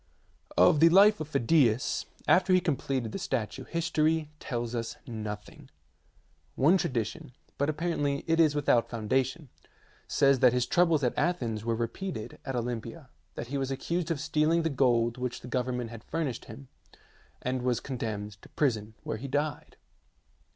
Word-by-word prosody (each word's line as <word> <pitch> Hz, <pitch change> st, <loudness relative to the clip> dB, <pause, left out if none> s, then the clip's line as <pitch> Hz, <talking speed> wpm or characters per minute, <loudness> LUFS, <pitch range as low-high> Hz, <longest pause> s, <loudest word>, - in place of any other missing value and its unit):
Of 90 Hz, -, +6 dB
the 165 Hz, +2 st, +7 dB
life 200 Hz, +4 st, +6 dB
of 155 Hz, -, -4 dB
Phidias, 135 Hz, -3 st, +2 dB, 0.2 s
after 185 Hz, +1 st, +4 dB
he 185 Hz, -, +6 dB
completed 135 Hz, -, -2 dB
the -, -, -4 dB
statue, 115 Hz, -5 st, -3 dB
history 160 Hz, -2 st, 0 dB
tells 120 Hz, -3 st, -4 dB
us 115 Hz, -1 st, -4 dB
nothing. 105 Hz, -3 st, -7 dB, 0.9 s
One 165 Hz, +8 st, +4 dB
tradition 120 Hz, -3 st, -3 dB, 0.3 s
but 145 Hz, +2 st, +1 dB
apparently 150 Hz, -3 st, -1 dB
it 165 Hz, 0 st, +1 dB
is 155 Hz, -3 st, +4 dB
without 135 Hz, -5 st, +2 dB
foundation 130 Hz, +6 st, -1 dB, 0.6 s
says 140 Hz, -2 st, +3 dB
that 125 Hz, -1 st, +5 dB
his 125 Hz, -1 st, +1 dB
troubles 165 Hz, -5 st, +3 dB
at 125 Hz, -, +1 dB
Athens 120 Hz, -11 st, -1 dB
were 115 Hz, 0 st, 0 dB
repeated 115 Hz, -, -5 dB
at 135 Hz, -2 st, -4 dB
Olympia, 120 Hz, +3 st, -5 dB, 0.2 s
that 120 Hz, -, -6 dB
he 140 Hz, +1 st, -2 dB
was 135 Hz, -1 st, -2 dB
accused 165 Hz, +5 st, -2 dB
of 165 Hz, -4 st, -1 dB
stealing 160 Hz, +3 st, +2 dB
the 165 Hz, -, 0 dB
gold 120 Hz, -3 st, +2 dB
which 125 Hz, -1 st, -3 dB
the -, -, -9 dB
government 125 Hz, -1 st, -2 dB
had 115 Hz, -1 st, -9 dB
furnished 150 Hz, -7 st, -3 dB
him, 70 Hz, -1 st, -11 dB, 0.8 s
and 130 Hz, 0 st, -1 dB
was 125 Hz, -1 st, 0 dB
con 130 Hz, -2 st, -6 dB
demned 105 Hz, -3 st, -5 dB
to -, -, -15 dB
prison, 110 Hz, -6 st, -1 dB
where -, -, -3 dB
he 135 Hz, +5 st, -6 dB
died. 145 Hz, +2 st, -2 dB
130 Hz, 160 wpm, -29 LUFS, 115-155 Hz, 0.9 s, the